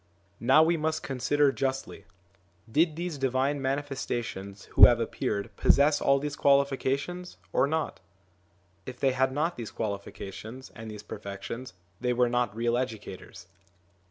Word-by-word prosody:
Now 130 +6 +6
we 165 +1 +2
must 155 0 -1
consider 140 +2 +2
justly: 135 0 -3 0.7
did 155 +4 +3
these 170 -3 -4
Divine 135 +2 0
Manifestations 125 -8 -3
1 - - -19
who - - +10
have 120 -1 +3
appeared 105 -3 -3
possess 145 +2 +4
all 140 0 +4
these 145 +1 -3
qualifications 140 +5 +1 0.2
or 130 - +3
not? 160 +2 -2 0.9
If 125 -1 -7
they 135 - +3
had 130 +1 +1
not 155 +5 -1
these 115 -3 -5
quali 100 -3 -3
fications 110 +6 -9
and 110 -1 -8
these 105 -1 -8
perfections, 115 +5 -7 0.3
they 125 0 0
were 125 0 +3
not 120 -3 0
real 120 +1 +1
educators. 110 -7 -6
130 Hz, 145 wpm, -28 LUFS, 115-145 Hz, 0.9 s, who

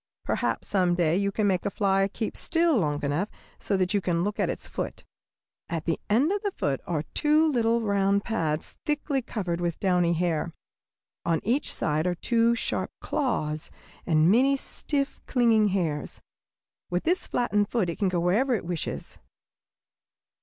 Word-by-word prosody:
Perhaps - - -1
some 180 -3 +2
day 170 -2 +2
you 200 +1 +1
can 210 +1 0
make 185 -3 +1
a - - 0
fly 195 -1 +2
keep 220 - -3
still 330 -1 +2
long 150 -9 0
enough 150 +9 0 0.3
so 195 - 0
that 185 +1 +1
you 205 - +2
can 170 -2 0
look 205 +2 -2
at - - +1
its - - -2
foot. - - -5 0.7
At 165 -3 -3
the 165 - 0
end 255 - +3
of 410 0 0
the 410 - 0
foot 140 - -2
are 160 -4 -1
two 305 +1 +3
little 235 -2 +2
round 200 -1 +2
pads 160 -9 -2
thickly 295 -2 0
covered 180 -8 -3
with 170 -2 -2
downy 180 -3 +2
hair. 170 -1 -1 0.7
On 165 -1 +1
each 255 +7 0
side 155 +2 0
are 180 - 0
two 230 +5 +2
sharp - - -2
claws 155 - -1 0.4
and 160 +1 +4
many 270 +5 +4
stiff, 280 +1 -2
clinging 230 -4 +4
hairs. 170 -7 -2 0.7
With 180 0 -1
this 360 +2 0
flattened 205 -4 +1
foot 225 -7 +1
it 170 - -4
can 200 -3 +2
go 180 -1 0
wherever 230 +9 +2
it 200 - -4
wishes. 175 -2 -4
195 Hz, 170 wpm, -27 LUFS, 170-235 Hz, 0.7 s, and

